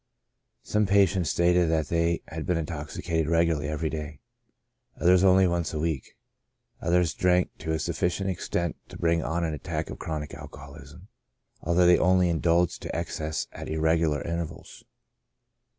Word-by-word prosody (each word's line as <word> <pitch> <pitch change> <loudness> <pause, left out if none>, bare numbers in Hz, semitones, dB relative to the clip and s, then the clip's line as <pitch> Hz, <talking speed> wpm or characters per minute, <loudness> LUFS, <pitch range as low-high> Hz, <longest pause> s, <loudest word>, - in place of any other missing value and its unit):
Some 105 -1 +1
patients 95 -4 +3
stated 85 0 +3
that 80 -1 0
they 85 0 +1
had 80 -1 -6
been 90 - +1
intoxicated 80 +1 -3
regularly 80 -3 +1
every 75 +1 -2
day; 75 -1 -6 0.8
others 90 +1 +5
only 95 0 +6
once 85 -3 -1
a - - -1
week; 80 -4 -3 0.6
others 85 -2 +2
drank 90 +3 +1
to 80 - -3
a - - +1
sufficient 85 +4 -1
extent 85 -2 -2
to - - -9
bring 85 0 +1
on 85 +2 -2
an 80 -2 -1
attack 75 - -4
of - - -8
chronic 75 -2 -5
alcoholism, - - -11 0.5
although 85 +2 +3
they 90 0 +6
only 90 -1 +3
indulged 85 +1 +1
to - - -5
excess 80 -2 -3
at - - -8
irregular 80 -2 +1
intervals. 85 -1 -6
85 Hz, 150 wpm, -27 LUFS, 80-90 Hz, 0.8 s, only